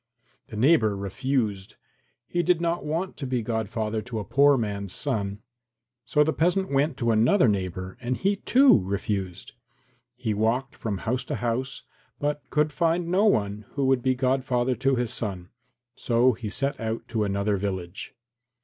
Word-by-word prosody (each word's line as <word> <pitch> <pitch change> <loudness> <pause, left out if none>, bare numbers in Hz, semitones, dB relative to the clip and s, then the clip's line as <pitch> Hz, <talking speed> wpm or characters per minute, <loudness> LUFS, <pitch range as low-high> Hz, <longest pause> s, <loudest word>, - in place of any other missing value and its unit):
The 110 - -8
neighbour 110 -5 +4
refused. 105 -1 -2 0.5
He 175 +6 -1
did 175 0 +2
not 170 0 -1
want 165 +5 -3
to 135 - -4
be 125 -2 -1
godfather 110 -1 -2
to 120 0 -6
a 105 - -3
poor 140 +1 +4
man's 100 -4 -3
son. 105 -7 -2 0.6
So 150 +5 +3
the 160 +1 0
peasant 180 +2 +1
went 140 +1 +1
to 115 -2 +1
another 120 - +4
neighbour 95 -2 -2
and 125 0 -2
he, 200 +1 +1
too, 260 - +5
refused. 95 -1 -3 0.6
He 110 - -2
walked 115 +6 0
from 105 -3 -3
house 125 +2 0
to - - -3
house, 120 +3 -2 0.4
but 145 0 -1
could 150 0 +1
find 170 +2 0
no 190 +4 +3
one 105 - +1
who 140 -1 0
would 130 -1 +3
be 130 +1 +1
godfather 130 -1 +1
to 135 0 +2
his 120 -2 -1
son, 95 -5 -4 0.4
so 125 +1 +2
he 110 -1 -6
set 135 +5 -1
out 115 0 -3
to 110 -3 0
another 100 0 0
village. 95 0 -5
120 Hz, 165 wpm, -26 LUFS, 105-140 Hz, 0.6 s, too